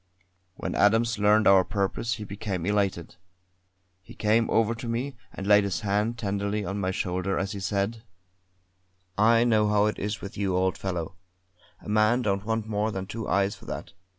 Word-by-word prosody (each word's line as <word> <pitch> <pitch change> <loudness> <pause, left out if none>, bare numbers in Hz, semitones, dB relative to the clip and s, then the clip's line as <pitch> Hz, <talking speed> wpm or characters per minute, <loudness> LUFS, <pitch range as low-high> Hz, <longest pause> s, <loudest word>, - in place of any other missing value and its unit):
When - - -4
Adams 115 +2 +3
learned 105 +1 +4
our 95 -1 +6
purpose 100 +5 -2
he 110 - -7
became 100 -4 -4
elated. 100 -5 -1 0.8
He 90 - -14
came 110 +2 +2
over 115 0 +2
to 115 +1 -7
me 125 +4 -3 0.2
and 95 - -7
laid 105 0 +6
his 100 0 -2
hand 105 +3 0
tenderly 100 -1 -2
on 100 +1 -3
my 95 -1 -1
shoulder 95 +1 -2
as 95 +1 -2
he 100 - -5
said: 100 +3 -2 1.1
"I 115 +3 +4
know 110 -3 +3
how 105 0 +3
it 105 - -1
is 105 +2 -3
with 100 - -8
you, 95 -3 0
old 95 0 +1
fellow; 90 -2 -4 0.6
a - - -13
man 110 +4 +3
don't 100 -1 -1
want 110 0 -1
more 105 0 0
than 95 -2 -4
two 110 +3 -6
eyes 100 +1 +2
for - - -16
that. - - -7
105 Hz, 180 wpm, -26 LUFS, 100-110 Hz, 1.1 s, our